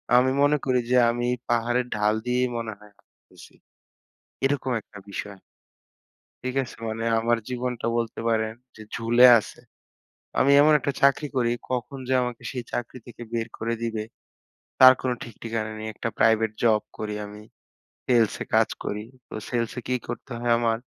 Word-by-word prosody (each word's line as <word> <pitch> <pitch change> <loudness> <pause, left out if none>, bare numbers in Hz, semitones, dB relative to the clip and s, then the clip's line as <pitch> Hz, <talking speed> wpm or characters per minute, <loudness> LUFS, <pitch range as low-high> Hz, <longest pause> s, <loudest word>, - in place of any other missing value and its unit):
আমি 130 +1 +5
মনে 145 +1 +4
করি 130 -2 +2
যে 125 - +5
আমি 120 +1 -1 0.2
পাহাড়ের 120 +1 +1
ঢাল 105 0 +2
দিয়েই 125 +1 +1
মনে 115 -1 -4
হয় 105 0 -17
হাটতেছি। - - -19 0.9
এরকম 135 -1 0
একটা 105 - -15
বিষয়। 100 0 -6 1.0
ঠিক 130 0 -3
আছে? 125 - -9
মানে 115 +1 -3 0.2
আমার 120 +1 +2
জীবনটা 125 -1 -3
বলতে 115 -1 -3
পারেন 110 -1 +1 0.2
যে 110 - -10
ঝুলে 120 +2 +5
আছে। 105 - -8 0.8
আমি 140 - +4
এমন 155 +1 +6
একটা 140 - -2
চাকরি 140 +2 +4
করি, 120 -2 +2 0.2
কখন 130 +2 -3
যে 130 - +2
আমাকে 125 -1 -4
সেই 125 -3 -5
চাকরি 120 +1 -4
থেকে 120 0 -11
বের 115 -1 -1
করে 115 +1 -1
দিবে, 115 -2 -2 0.8
তার 130 0 +10
কোনো 130 -1 0
ঠিক 120 - -10
ঠিকানা 110 -1 -3
নেই। 110 - -5
একটা 115 - -3
প্রাইভেট 110 -1 +4
জব 110 -2 +4 0.2
করি 105 -1 -4
আমি, 105 +1 -10 0.7
সেলসে 115 -4 +2
কাজ - - +5 0.2
করি। 105 +1 -3 0.2
তো - - -11 0.2
সেলসে 120 0 -2
কি 125 - +1
করতে 135 - -6
হয় 120 0 +1
আমার? 115 -1 +1
120 Hz, 165 wpm, -25 LUFS, 110-125 Hz, 1.0 s, তার